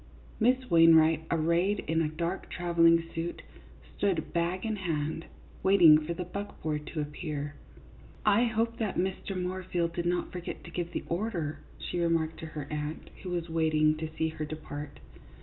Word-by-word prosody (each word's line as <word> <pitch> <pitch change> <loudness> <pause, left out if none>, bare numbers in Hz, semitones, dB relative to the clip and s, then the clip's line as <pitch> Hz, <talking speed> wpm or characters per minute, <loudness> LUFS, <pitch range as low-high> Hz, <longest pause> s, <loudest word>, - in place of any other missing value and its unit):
Miss 255 +3 +3
Wainwright, 160 -1 +6
arrayed 170 +5 +2
in 160 +1 0
a 160 - +1
dark 170 +4 -3
travelling 165 -1 +4
suit, 165 +1 -4 0.5
stood, 185 -6 0
bag 175 +3 0
in 220 -1 -1
hand, 160 -3 -2 0.4
waiting 175 -6 +7
for 160 +2 -4
the 180 - -3
buckboard 160 -6 -4
to 155 - -3
appear. 150 -1 -4 0.4
" - - -22 0.2
I - - +4
hope 230 0 0
that 215 -4 -1
Mr. 190 +1 -2
Moorfield 180 -2 -2
did 175 0 -2
not 175 0 0
forget 180 -1 -6
to 170 - -10
give 170 0 -3
the - - -3
order," 170 -5 -2 0.2
she 175 - -4
remarked 165 -2 +1
to 160 - -6
her 150 -2 -6
aunt, 150 +1 -4
who 185 - -6
was 175 -1 -2
wait 160 -1 +1
ing 155 0 +4
to 160 0 -4
see 160 - +1
her 155 -1 -5
depart. 150 -1 -7
170 Hz, 170 wpm, -30 LUFS, 155-180 Hz, 0.5 s, waiting